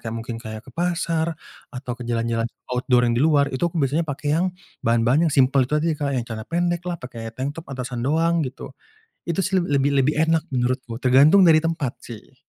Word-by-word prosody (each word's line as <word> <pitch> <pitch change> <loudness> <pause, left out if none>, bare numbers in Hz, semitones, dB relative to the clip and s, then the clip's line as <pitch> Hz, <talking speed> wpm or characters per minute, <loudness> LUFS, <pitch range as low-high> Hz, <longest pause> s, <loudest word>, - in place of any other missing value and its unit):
kayak 115 0 -5
mungkin 115 0 -6
kayak 110 -2 -7
ke - - -12
pasar, 165 0 -1 0.4
atau 125 -1 -5
jalan-jalan 115 -1 -1 0.3
outdoor 125 -1 +3
yang 120 - +1
di 120 - +1
luar, 145 -3 +3
itu 130 - -3
aku 170 - -9
biasanya 145 +4 +1
pakai 145 +1 -4
yang, 175 +3 +1 0.4
bahan-bahan 120 +8 +3
yang - - -3
simpel 135 0 +4
itu 150 +4 -1
tadi 165 +1 +1
Kak, 140 -1 -2
yang 120 - -1
celana 110 -1 -6
pendeklah, 175 +1 -1
pakai 115 -3 -7
tanktop 145 +5 -5
atasan 125 -2 -5
doang, 165 +4 +2
gitu. 130 - -7 0.6
Itu 170 +1 -2
sih 190 0 0
leb 180 -2 +2
lebih 140 +1 +2
lebih 150 - +2
enak 160 -1 +2
menurutku, 125 -1 -1
tergantung 140 +9 +6
dari 160 -1 +7
tempat 160 -6 -2
sih. 120 +3 -11
140 Hz, 195 wpm, -22 LUFS, 125-165 Hz, 0.6 s, dari